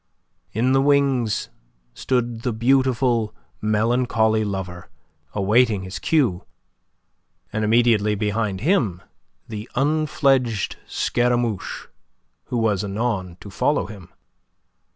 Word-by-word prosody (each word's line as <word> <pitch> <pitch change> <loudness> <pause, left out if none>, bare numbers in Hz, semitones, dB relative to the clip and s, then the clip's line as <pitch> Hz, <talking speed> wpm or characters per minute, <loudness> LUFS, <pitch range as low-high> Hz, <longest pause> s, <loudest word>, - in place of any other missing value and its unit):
In 120 +4 +1
the 135 0 +4
wings 135 -7 +2 0.4
stood 120 - -1
the 125 - -1
beautiful, 125 -1 +2 0.3
melancholy 110 0 +2
lover, 90 -5 -5 0.4
awaiting 105 0 +2
his 95 +1 -6
cue, 130 - +1 1.1
and 110 - -1
immediately 110 -2 +3
behind 105 -1 -1
him 120 - +1 0.4
the 110 0 -7
unfledged 135 - +1
Scaramouche, 120 -4 -1 0.6
who 125 - -3
was 105 -4 +1
anon 100 -4 -2
to 100 - -10
follow 145 +7 +1
him. 100 -3 -11
115 Hz, 95 wpm, -22 LUFS, 105-125 Hz, 1.1 s, the